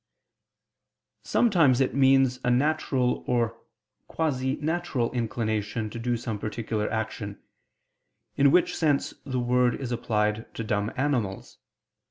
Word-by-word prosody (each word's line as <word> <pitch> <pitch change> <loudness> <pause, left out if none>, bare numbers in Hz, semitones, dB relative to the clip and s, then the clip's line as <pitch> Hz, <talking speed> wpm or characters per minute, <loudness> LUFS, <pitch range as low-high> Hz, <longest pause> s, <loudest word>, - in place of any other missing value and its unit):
Sometimes 165 - +3
it 130 - +1
means 135 -2 +4
a - - +1
natural 130 -1 +1
or 120 -2 0 0.5
quasi 135 -4 -1
natural 155 -6 -1
inclination 110 -2 -2
to 115 - -6
do 120 +1 -1
some 115 -3 -4
particular 110 0 -3
action, 110 -2 -4 1.0
in 140 0 +5
which 180 +5 +3
sense 150 -4 +1
the 130 -2 -2
word 125 0 +2
is 130 -3 -5
applied 110 -2 -1
to 115 - -3
dumb 105 -1 -1
animals. 125 -8 -2
125 Hz, 120 wpm, -26 LUFS, 110-135 Hz, 1.0 s, in